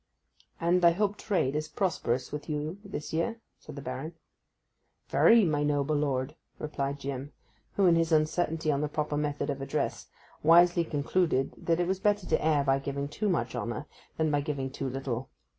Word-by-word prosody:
'And 175 +2 +2
I 170 0 +7
hope 205 +2 0
trade 180 -11 0
is 155 0 -1
prosperous 135 - -1
with 150 +1 -6
you 155 +5 -3
this 195 -8 -6
year,' 225 +9 -1 0.2
said 150 - -11
the 140 - -7
Baron. 135 +6 -5 0.9
'Very, 230 -3 +6
my 150 -3 +1
noble 145 0 +1
lord,' 140 -2 -1 0.2
replied 140 -2 -3
Jim, 140 0 -5 0.4
who, 200 - +2
in 175 -2 +6
his 165 0 +1
uncertainty 155 0 +1
on 140 0 0
the 150 - -1
proper 150 0 -2
method 145 -1 -1
of 140 -1 -5
address, 135 - -2 0.3
wisely 170 +2 +6
concluded 150 -2 0
that 165 0 0
it 175 - +2
was 190 0 0
better 205 -2 +1
to - - +1
err 150 -2 +3
by 135 0 +2
giving 140 +1 -3
too 205 +8 -1
much 125 -10 0
honour 120 +6 -3 0.3
than 160 -1 +1
by 145 -1 +2
giving 140 -3 -3
too 135 -1 -3
little. 130 -1 -4
150 Hz, 180 wpm, -29 LUFS, 140-170 Hz, 0.9 s, I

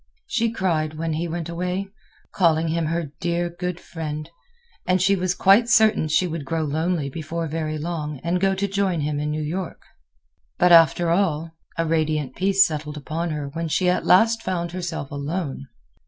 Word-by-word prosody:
She 230 - 0
cried 160 -7 -1
when 165 0 -2
he 165 +3 -2
went 165 0 -4
away, 180 +3 -3 0.4
calling 165 -3 +2
him 165 0 0
her 165 -2 -2
dear, 175 0 -1
good 180 0 -4
friend, 155 -2 -6 0.6
and 185 0 +3
she 200 +2 +3
was 185 -1 -1
quite 205 +5 +5
certain 220 -8 +4
she 155 +4 +2
would 165 -3 -4
grow 160 +3 -2
lonely 155 +1 -1
before 165 +3 -4
very 155 0 -3
long 150 -3 -4
and 175 +2 0
go 195 0 +2
to 200 +1 -1
join 195 -4 0
him 145 0 -1
in 150 0 -2
New 155 0 -2
York. 170 +4 -4 0.7
But 180 0 +4
after 165 0 +6
all, 165 -3 +1 0.3
a 165 - +1
radiant 155 -4 0
peace 195 +1 +4
settled 150 -1 -4
upon 160 +4 -3
her 150 -2 -4
when 165 +3 -4
she 180 +3 +1
at - - -1
last 225 +5 +4
found 175 -4 -2
herself 175 -6 -5
alone. 140 -1 -4
165 Hz, 180 wpm, -23 LUFS, 155-180 Hz, 0.7 s, after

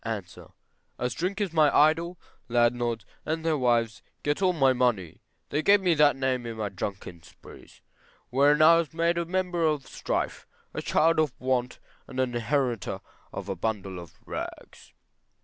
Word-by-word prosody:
A. 110 -3 -3 0.7
As 125 0 -2
drink 185 - -2
is 200 -5 -2
my 155 -2 +5
idol, 165 +4 +3 0.3
landlords 120 -2 +1 0.2
and 160 +1 -3
their 160 -1 +2
wives 120 -4 +1 0.2
get 145 +5 0
all 185 -1 +4
my 135 -6 +3
money; 120 -10 0 0.3
they 150 - 0
gave 200 +5 +5
me 180 -3 +2
that 150 -2 +4
name 130 -2 -1
in 115 -1 -6
my 105 -2 -2
drunken 95 -3 -6
sprees, - - -16 0.5
wherein 145 +4 +4
I 165 +1 +8
was 165 -2 -2
made 170 +1 +1
a 170 - -1
member 180 -1 -1
of 150 -4 +1
strife, - - -3 0.3
a - - -3
child 165 +1 +2
of 155 -5 0
want, 125 -1 -1 0.3
and 130 - -6
an 130 -2 0
inheritor 120 -2 -1 0.3
of 100 - -6
a 95 - -2
bundle 95 -1 -3
of 85 -2 -13
rags. - - -8
130 Hz, 165 wpm, -27 LUFS, 115-160 Hz, 0.7 s, I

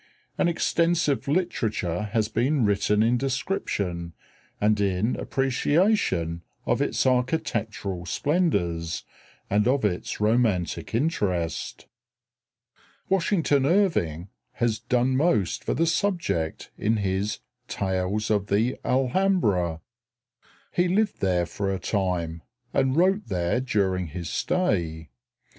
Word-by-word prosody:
An - - +2
extensive 165 -4 +1
literature 110 - -1
has 110 -2 +1
been 125 +3 +1
written 105 +1 +2
in 120 +2 +2
description 100 - -2 0.5
and 105 0 +2
in 100 +4 +1
appreciation 135 - +1 0.2
of - - +1
its - - 0
architectural 115 - -1
splendors 90 - 0 0.4
and 105 +3 +2
of 130 -2 +2
its 90 -4 -2
romantic 105 -6 +1
interest. 95 - -1 1.2
Washington 165 -7 +2
Irving 100 - +1 0.2
has 120 -3 0
done 125 +2 +1
most 130 - +1
for - - -1
the 165 - +2
subject 165 - -1
in 110 +2 +1
his 100 +1 -1 0.3
"Tales 95 +3 -1
of 100 -2 +1
the 110 +6 +1
Alhambra." 125 - +1 0.9
He 175 +1 +2
lived 205 +4 +1
there 90 -2 +2
for 100 +2 -3
a 95 - -1
time, 90 -5 -2 0.3
and 130 0 +2
wrote 190 +5 +2
there 90 +3 0
during 95 -7 0
his 85 +2 -6
stay. 85 - -1
110 Hz, 110 wpm, -25 LUFS, 90-140 Hz, 1.2 s, An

